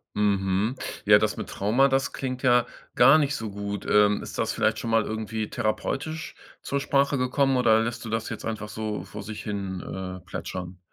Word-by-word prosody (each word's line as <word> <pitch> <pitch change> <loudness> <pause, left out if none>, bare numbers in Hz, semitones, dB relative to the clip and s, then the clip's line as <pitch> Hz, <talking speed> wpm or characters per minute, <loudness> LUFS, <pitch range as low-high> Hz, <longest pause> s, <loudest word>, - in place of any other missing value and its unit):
Mhm. 100 +2 +1 0.3
Ja, 105 0 +7
das 110 0 0
mit - - -5
Trauma, 115 +8 +3
das 135 0 0
klingt 130 -1 -4
ja 125 -2 +4 0.3
gar 135 +6 +7
nicht 140 -1 +1
so 110 -5 -5
gut. 100 0 -5
Ähm, 105 0 +4
ist - - -8
das - - +1
vielleicht - - +1
schon 115 - -4
mal 115 -1 +3
irgendwie 110 0 -3
therapeutisch 135 +7 -2 0.3
zur 140 - -2
Sprache 140 0 +2
gekommen, 130 +1 +2
oder 110 -3 +4
lässt 120 +1 -4
du - - -5
das 115 0 -2
jetzt - - -6
einfach 110 -1 -4
so 105 -3 -4
vor 100 +2 -8
sich 105 0 -7
hin 95 -3 -4
äh, 95 -1 -6
plätschern? 90 -1 -6
110 Hz, 190 wpm, -26 LUFS, 100-125 Hz, 0.3 s, Ja